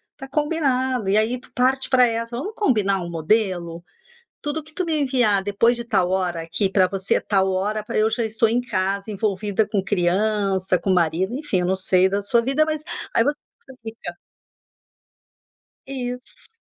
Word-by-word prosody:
Tá 270 - -9
combinado, 265 -6 0
e 205 - +3
aí, 230 +3 +1
tu - - -19
parte 260 +1 +1
pra 255 -2 +5
essa: 230 +1 -3
"Vamos 395 - -4
combinar 205 - +1
um 175 - -5
modelo? 170 -1 -1 0.6
Tudo 300 +1 -3
que 310 +1 -15
tu 365 - -2
me 320 -3 0
enviar 245 -8 +2
depois 205 +4 +2
de 235 - -4
tal 190 -5 +1
hora, 180 -3 -1
aqui, 165 +5 -1
pra 190 -2 +3
você 195 0 -1
é - - +1
tal 190 -2 +1
hora 205 +3 -1
pra - - -6
eu 215 +1 +3
já 230 +1 -1
estou 220 0 +1
em 240 +2 +2
casa, 195 -2 -2
envolvida 205 0 -1
com 200 -3 0
criança, 190 0 +1
com 195 - -1
marido", 180 +4 +1
enfim, 280 -10 -1
eu 180 - 0
não 190 - +2
sei 190 0 +3
da 200 +1 -1
sua 235 +3 +2
vida, 270 +6 +2
mas 310 -1 -2 0.3
aí - - +5
voc 290 0 +1 0.3
você 265 - -13
fica 220 -6 -7 1.7
Isso. 250 -2 -6
215 Hz, 185 wpm, -22 LUFS, 190-250 Hz, 1.7 s, pra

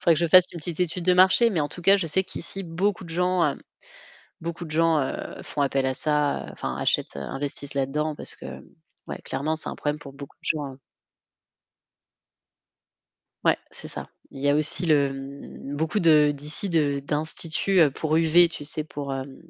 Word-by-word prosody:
faudrait 170 -2 +4
que 155 - -1
je 170 - +2
fasse 180 +2 +6
une 170 - -7
petite 165 +1 -5
étude 180 0 -1
de 180 - +5
marché, 190 +6 +5
mais 180 -7 0
en 145 - -1
tout 175 - -10
cas 195 +3 +6
je 170 - -2
sais 190 +5 +1
qu'ici 195 +2 -6
beaucoup 185 +3 -1
de 170 - -10
gens, 180 +1 +1
heu, - - -14 0.8
beaucoup 170 +1 -5
de 155 - -10
gens, 165 0 +3
heu, 135 - -4
font 145 - -3
appel 135 -1 +1
à 130 - 0
ça, 150 +1 +1
heu, - - -8
enfin - - -5
achètent, - - 0
heu, - - -4
investissent 140 - -4
là-dedans 150 +3 -1
parce - - -6
que - - -12 0.6
ouais, - - -6
clairement 155 +3 -2
c'est 160 - 0
un - - -6
problème 150 0 -2
pour 140 -2 -11
beaucoup 140 0 -11
de - - -16
gens. 140 -3 -6 2.7
Ouais, - - +4
c'est - - -5
ça. - - -5 0.2
Il 135 - -10
y 145 - +1
a 145 - +4
aussi 155 +4 +4
le 145 -3 +3 0.6
beaucoup 160 +7 -1
de 150 -4 +5
d'ici 150 +7 -4
de 145 -4 +1
d'instituts, 160 +6 -1
heu, 155 -3 +6
pour 155 +3 -1
UV, 165 +1 +5
tu 150 - -8
sais 150 +1 -3
pour, 140 -3 -6
hem 135 0 -6
155 Hz, 200 wpm, -25 LUFS, 145-170 Hz, 2.7 s, fasse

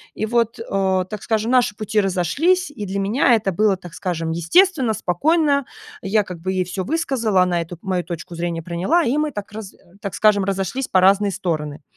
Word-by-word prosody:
И 215 - -2
вот, 235 0 0
а, 190 -1 +1
так 210 +2 -7
скажем, 220 +1 -1
наши 245 -5 +3
пути 215 0 0
разошлись, 280 - +1
и 210 -8 -6
для 195 +1 -3
меня 230 +5 +3
это 210 -3 -1
было, 200 +2 +2
так 175 -3 -12
скажем, 165 -3 -3
естественно, 260 - +3
спокойно. 285 - +1 0.4
Я 210 +2 +1
как 180 -3 -9
бы 185 +3 -3
ей 185 -1 0
всё 185 +1 -4
высказала, 250 - +1
она 175 -1 0
эту 170 +1 -8
мою 185 -2 -1
точку 170 0 -7
зрения 170 -1 -3
приняла, 180 - +1
и 260 -1 0
мы 305 0 +1
так 205 -5 -7
раз 210 -2 -8 0.3
так 200 - -5
скажем, 210 -2 +3
разошлись 195 +7 -2
по 185 - +3
разные 200 +2 +4
стороны. 155 -6 -3
200 Hz, 195 wpm, -21 LUFS, 180-235 Hz, 0.4 s, разные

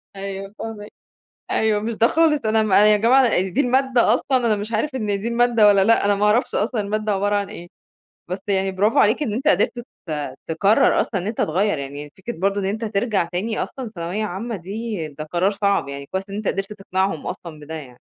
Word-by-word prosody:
أيوه 195 0 -6
فاهماك، 215 -2 -7 0.6
أيوه، 215 -1 +1
مش 225 +1 -3
ده 230 - +4
خالص 305 -6 +2
أنا 220 0 +3
م 210 -3 -1
يا 210 +2 +6
جماعة 235 -1 +4
دي 190 +9 -1
المادة 255 -3 +3
أصلًا 260 +1 0
أنا 215 -2 +2
مش 210 +3 -5
عارف 260 +6 -1
إن 220 -5 -2
دي 230 - -3
المادة 235 -2 +3
والّا 195 -1 +5
لأ، 230 -1 +3
أنا 205 0 +3
ما 205 +1 +1
أعرَفش 220 +4 +2
أصلًا 220 +1 0
المادة 210 +1 -1
عبَارة 205 +1 +1
عن 200 -1 -1
إيه، 175 +1 -10 0.6
بس 185 +2 -4
يعني 195 -1 +1
براڤو 210 +4 +2
عليك 220 +8 +4
إن 215 - -2
أنت 250 - -2
قِدرت 205 +6 +2 0.3
ت 145 -4 -4
تكرر 195 +6 +3
أصلًا 195 -5 -2
إن 195 - -5
أنت 220 - -4
تغيّر، 185 +2 +1
يعني 145 +1 -7
فكرة 225 +3 -7
برضه 200 +2 0
إن - - -2
أنت 220 +3 -2
ترجَع 205 -3 0
تاني 190 +6 -2
أصلًا 255 -4 -7
ثانوية 175 +6 -3
عامة 210 +4 -4
دي 200 -1 -5
ده 150 +1 -8
قرار 175 +5 0
صعب، 200 -6 0
يعني 140 0 -6
كويس 190 +1 -2
إن 200 - -6
أنت 210 0 -4
قِدرت 195 +2 -2
تقنعهم 190 -4 -2
أصلًا 160 -3 -7
بده 150 +2 -9
يعني. 135 -5 -9
205 Hz, 215 wpm, -21 LUFS, 190-225 Hz, 0.6 s, يا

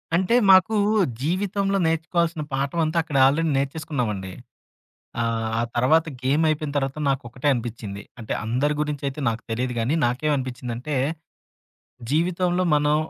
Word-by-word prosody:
అంటే 190 +6 +2
మాకు 190 +3 +6 0.5
జీవితంలో 195 +5 0
నేర్చుకోవాల్సిన 165 0 0
పాఠం 140 +5 -1
అంతా 155 +2 -2
అక్కడ 155 -4 -2
ఆల్‌రెడీ 155 +4 +1
నేర్చేసుకున్నామండి. 135 - -2 0.9
ఆహ్, 115 -1 -1
ఆ - - +2
తర్వాత 145 +7 +3 0.2
గేమైపోయిన 150 +2 +1
తర్వాత 135 +1 -2
నాకొకటే 130 0 -2
అనిపిచ్చింది. 115 -4 -5 0.2
అంటే 110 - -4
అందరి 130 +6 +1
గురించయితే 145 -1 -3
నాకు 115 0 -4
తెలీదు 125 +2 -1
గానీ, 115 +6 0
నాకేమనిపించిందంటే, 125 0 -2 1.2
జీవితంలో 175 +3 +1
మనం 150 0 +2
145 Hz, 115 wpm, -23 LUFS, 125-165 Hz, 1.2 s, మాకు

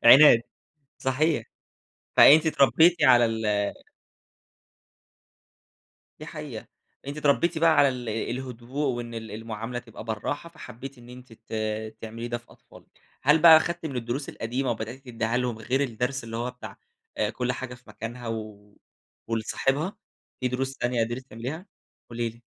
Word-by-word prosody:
عناد، 130 -1 +9 0.6
صحيح. 130 0 +1 0.7
فأنتِ 155 +3 +8
اتربيتِ 160 +4 +4
على 120 -2 +7
ال 115 -1 -1 2.7
دي - - -8
حقيقة - - -7 0.4
أنتِ 145 +2 -5
اتربيتِ 150 +3 +2
بقى 165 +1 +5
على 140 - +6
ال 125 -3 -5
الهدوء 125 +4 -3
وإن 120 -1 -6
ال 110 -2 -7
المعاملة 115 +2 -5
تبقى 115 -2 -11
بالراحة 115 +9 -4
فحبيتِ 135 -3 -10
إن 120 0 -15
أنت 125 -1 -12
ت 110 - -14 0.5
تعملي 115 +1 -6
ده 120 0 -2
في 120 - -20
أطفالِك، - - -19 0.2
هل 150 +4 +5
بقى 165 -2 +10
أخدتِ 170 0 -2
من 140 -4 -4
الدروس 120 +4 -3
القديمة 125 +3 -2
وبدأت 115 +3 -5
تديها 115 -1 -1
لهم 125 -3 -1
غير 130 +5 -1
الدرس 125 +1 -2
اللي 115 0 -6
هو 125 +1 -2
بتاع 125 - -10 0.4
آآ، - - +1
كل 125 0 -2
حاجة 125 0 -6
في 120 - -22
مكانها 115 +3 -7
و 105 -2 -7 0.5
ولصاحبها، 135 - -1 0.4
في 130 - 0
دروس 130 +2 -2
تانية 120 -1 +1
قدرتِ 120 +3 -4
تعمليها؟ 135 - -6 0.4
قولي 115 0 -2
لي. 115 +1 -17
125 Hz, 145 wpm, -26 LUFS, 115-135 Hz, 2.7 s, بقى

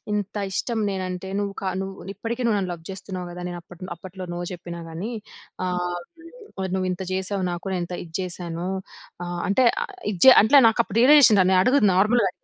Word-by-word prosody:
ఇంత 205 0 -2
ఇష్టం 230 +4 -2
నేను 190 -1 -3
అంటే 180 +1 -6
నువ్వు 200 -1 -2
క - - -7 0.2
నువ్వు 195 0 -7
ఇప్పటికీ 230 +5 -4
నువ్వు 220 - +2
నన్ను 185 -2 -2
లవ్ 170 -2 -8
చేస్తున్నావు 185 -1 -6
గదా! 180 +1 -8
నేను 175 - -6
అప్పట్లో 180 +2 -11
అప్పట్లో 185 +2 -9
నో - - -4
చెప్పినా 170 -1 -7
గానీ 170 +8 -5 0.6
ఆహ్, 180 -1 -2 0.6
మరి 190 -1 -2
నువ్వు 185 -1 0
ఇంత 180 +1 -4
చేశావు 190 +1 -2
నాకు 175 +2 -5
నే - - -1
ఎంత 175 +1 -5
ఇది 165 -2 -16
చేశానో 175 -1 -4 0.6
ఆ! - - -6 0.2
అంటే 225 +6 +3 0.2
ఆహ్, 400 - -9 0.2
ఇజ్జే 210 +8 +8
అంట్లే 275 +7 +7
నాకు 225 - 0
అప్పుడు 205 - -3
రియలైజేషన్ 255 -5 +7
రా - - +1
నే - - +5
అడుగుతున్నా 230 -5 +4
నార్మల్‌గా. 215 0 +3
190 Hz, 200 wpm, -24 LUFS, 180-210 Hz, 0.6 s, ఇజ్జే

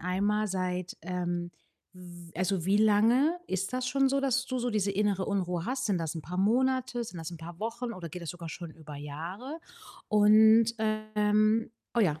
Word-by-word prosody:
einmal: 205 +4 0
Seit, 185 -2 -3
ähm, 175 -1 -3 0.4
w 175 -2 -12
also, 185 0 -1
wie 195 +2 +4
lange 230 +10 +4
ist 190 +5 -2
das 255 0 -1
schon 270 +1 +3
so, 275 0 +1
dass 260 -1 +1
du 255 -1 -2
so 245 - -1
diese 205 -2 +1
innere 200 -1 0
Unruhe 180 -4 -1
hast? 260 0 -1
Sind 195 -4 +1
das 165 -1 -3
'n 160 - -4
paar 180 +4 -6
Monate? 245 +3 +1
Sind 185 - -9
das 165 +1 -5
'n 170 - -7
paar 170 +1 -9
Wochen 230 +2 -3
oder 170 -2 -7
geht 180 +4 -8
das 165 - -4
sogar 170 -2 -8
schon 170 0 -7
über 155 -2 -11
Jahre? 175 - -7 0.5
Und, 220 +2 +6 0.4
ähm 215 +2 +3 0.2
oh 235 - +3
ja, 155 -7 +2
200 Hz, 190 wpm, -29 LUFS, 175-230 Hz, 0.5 s, Und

